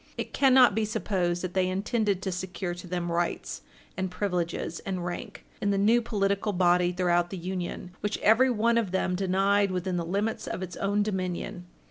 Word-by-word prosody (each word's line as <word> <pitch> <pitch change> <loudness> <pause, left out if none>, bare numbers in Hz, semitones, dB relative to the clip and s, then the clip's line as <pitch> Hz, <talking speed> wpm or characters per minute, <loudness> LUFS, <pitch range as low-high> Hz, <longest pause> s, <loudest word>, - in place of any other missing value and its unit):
It - - -5
cannot 260 -4 +6
be 220 +2 +1
supposed 190 -5 -1
that 180 -1 -3
they 185 -1 +2
intended 200 0 0
to 190 - -1
secure 180 0 -4
to 175 +1 -9
them 175 -1 -2
rights 170 0 -2 0.3
and 190 0 -2
privileges 180 -3 -2
and 185 -2 -4
rank, 175 0 -6 0.2
in 205 - +1
the 200 - +2
new 220 +4 +4
political 200 -2 0
body 180 -1 +3
throughout 175 -1 +1
the 190 - -5
Union 180 0 -4
which 210 0 -2
every 230 +5 +5
one 235 0 +2
of 220 -5 -2
them 185 0 0
denied 195 +2 +2
within 185 0 -2
the 170 - -1
limits 200 +6 -2
of 185 - -3
its 180 -1 -6
own 205 +1 +1
dominion. 185 -3 -3
190 Hz, 185 wpm, -28 LUFS, 180-205 Hz, 0.3 s, cannot